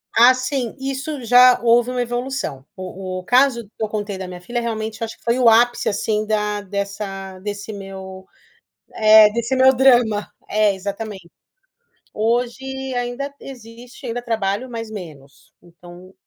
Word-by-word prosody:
Ah 245 +3 +7
sim, 255 -2 -3
isso 270 +1 -4
já 250 +1 +6
houve 240 +1 +3
uma 250 -1 -1
evolução. 245 - -3
O 185 0 -6
o - - -10
caso 250 +2 +3
que 205 - -22
eu - - 0
contei 205 -2 -4
da 190 - -6
minha 180 -1 -8
filha, 240 +6 -3
realmente, 220 -1 -4
acho 225 - -6
que - - -29
foi 235 +2 +1
o 235 -2 +6
ápice, 240 +2 +3
assim, 215 +1 -1
da 210 -1 -1
dessa 200 -1 -5
desse 205 +2 -6
meu 190 -1 -9 1.1
desse 235 +3 -1
meu 260 0 +6
drama, 240 -5 +3 0.2
é, 210 -1 +2
exatamente. 200 -2 -6 0.8
Hoje 250 +4 -2
ainda 245 +3 -3
existe 245 0 -11
ainda 240 +1 -3
trabalho, 220 0 -2
mas 230 -2 -6
menos, 150 -9 -11
então 175 +2 -15
225 Hz, 150 wpm, -20 LUFS, 195-245 Hz, 1.1 s, Ah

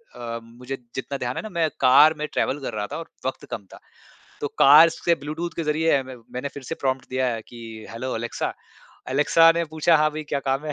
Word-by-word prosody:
अ, 115 -1 -5
मुझे 125 +3 -8 0.2
जितना 135 +1 -4
ध्यान 125 -1 -3
है - - -2
ना 220 - -6
मैं 170 -4 0
कार 135 +4 +7
में 150 0 -3
ट्रैवल 140 - 0
कर 125 - -5
रहा 105 -1 -3
था - - -3
और 165 0 -8 0.2
वक्त 130 - -3
कम 105 - -5
था। - - -12 0.6
तो - - -1
कार 150 +4 +9
से 170 +1 0
ब्लूटूथ 160 +3 -5
के 165 - -2
ज़रिए 150 -1 +2
म 130 -2 -11
मैंने 125 +3 -3
फिर 140 - -9
से 165 - -5
प्रॉम्प्ट 130 -2 -2
दिया 130 0 0
है 115 - -5
कि 120 - -12 0.3
हेलो 125 +3 -4
एलेक्सा, 115 +1 -3 0.6
एलेक्सा 150 +4 +5
ने 170 - +1
पूछा 160 +1 +4
"हाँ 155 0 +3
भाई 155 +1 -5
क्या 140 - +1
काम 135 +2 0
है?" 150 - -3
140 Hz, 230 wpm, -24 LUFS, 125-155 Hz, 0.6 s, कार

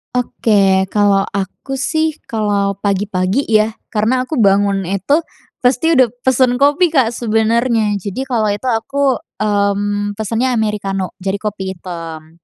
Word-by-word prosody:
Oke. 200 -6 +2
Kalau 205 -2 +3
aku 200 +7 -4
sih, 315 +2 -1
kalau 205 -3 0
pagi-pagi 200 +3 -1
ya 215 0 +3 0.2
karena 245 +4 0
aku 315 - -3
bangun 200 -3 +3
itu 200 - 0 0.4
pasti 270 +6 +3
udah 255 -4 +4
pesan 255 0 +2
kopi, 295 +5 +3
Kak 245 -6 +2
sebenarnya. 225 -1 +1
Jadi 205 +7 -4
kalau 220 -5 +1
itu, 205 +6 -4
aku, 260 +3 +1 0.2
mmm, 205 0 0
pesannya 230 +4 0
amerikano, 205 -5 -2
jadi 195 +1 -1
kopi 195 -3 -4
hitam. 165 -2 -9
215 Hz, 130 wpm, -16 LUFS, 200-250 Hz, 0.4 s, udah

